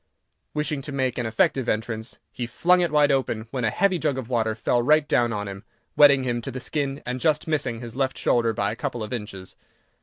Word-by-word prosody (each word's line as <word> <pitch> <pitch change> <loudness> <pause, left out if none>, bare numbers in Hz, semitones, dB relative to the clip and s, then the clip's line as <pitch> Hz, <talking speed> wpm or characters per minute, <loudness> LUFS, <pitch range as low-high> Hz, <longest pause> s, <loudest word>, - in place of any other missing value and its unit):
Wishing 150 -1 -1
to 140 - -7
make 130 -3 -1
an 120 - -1
effective 115 +3 +1
entrance, 110 +1 -3
he 120 - -4
flung 180 +9 +3
it 175 - +1
wide 150 -1 +4
open, 120 -5 -1
when 130 -3 -3
a 110 - +2
heavy 185 - +1
jug 140 - 0
of 130 -3 -5
water 110 -3 0
fell 120 +2 +1
right 150 +4 +3
down 120 -4 +2
on 105 -1 -3
him, 100 0 -8 0.3
wetting 140 -2 +6
him 120 -2 -1
to 125 - -6
the 130 0 -5
skin, 140 +1 -3
and 125 +1 -3
just 155 +2 +1
missing 135 -7 -1
his 120 -1 -8
left 135 0 -1
shoulder 115 -1 +2
by 100 -1 -1
a - - -5
couple 120 -3 -4
of 105 - -6
inches. 105 -5 -6
125 Hz, 230 wpm, -24 LUFS, 115-145 Hz, 0.3 s, wetting